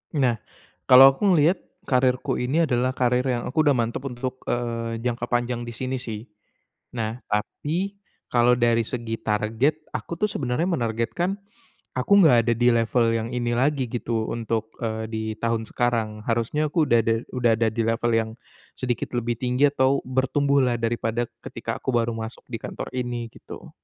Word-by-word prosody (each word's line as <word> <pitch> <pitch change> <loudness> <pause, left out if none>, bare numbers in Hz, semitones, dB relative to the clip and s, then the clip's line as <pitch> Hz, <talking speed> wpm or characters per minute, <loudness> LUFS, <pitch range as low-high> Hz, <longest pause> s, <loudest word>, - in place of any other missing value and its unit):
Nah, 125 -6 +2 0.5
kalau 130 +1 +10
aku 170 +10 -1
ngelihat 165 +3 +4 0.2
karierku 130 0 +1
ini 135 +7 +1
adalah 130 -3 +1
karir 125 0 +2
yang 120 -2 0
aku 130 - -2
udah 145 - +5
mantap 120 +2 -1
untuk, 130 0 -5
eee, 115 -1 -2
jangka 120 0 -2
panjang 120 0 -1
di 120 - -6
sini 130 +2 -3
sih. 110 -3 -6 0.7
Nah, 115 0 -3
tapi 165 - -2 0.3
kalau 120 0 +4
dari 120 -1 +2
segi 115 -2 -3
target 115 +9 0
aku 170 - -5
tuh 210 - +2
sebenarnya 135 - -1
menargetkan 125 - -1 0.6
aku 130 +9 -1
nggak 140 -8 +6
ada 120 - +4
di 120 +2 +3
level 115 +1 +2
yang 115 0 -1
ini 120 -1 -1
lagi 135 +1 +1
gitu 115 -2 -2
untuk, 115 -1 -3
eee, 110 -1 -2
di 110 -1 -3 0.2
tahun 115 -1 -1
sekarang, 115 -3 -1
harusnya 120 +7 0
aku 160 -1 +2
udah 120 0 +5
da 115 +1 +2 0.2
udah 125 -2 +2
ada 115 -1 +3
di 115 +2 -1
level 115 +1 +1
yang 110 -1 +1 0.5
sedikit 125 -1 -2
lebih 120 -1 -2
tinggi 125 +3 +2
atau 135 0 +2
bertumbuhlah 130 0 +2
daripada 115 0 -1 0.2
ketika - - -5
aku - - -2
baru 115 0 +1
masuk 110 +1 -7
di 115 - -3
kantor - - -6
ini, 120 -2 -3
gitu. - - -11
120 Hz, 165 wpm, -24 LUFS, 115-130 Hz, 0.7 s, kalau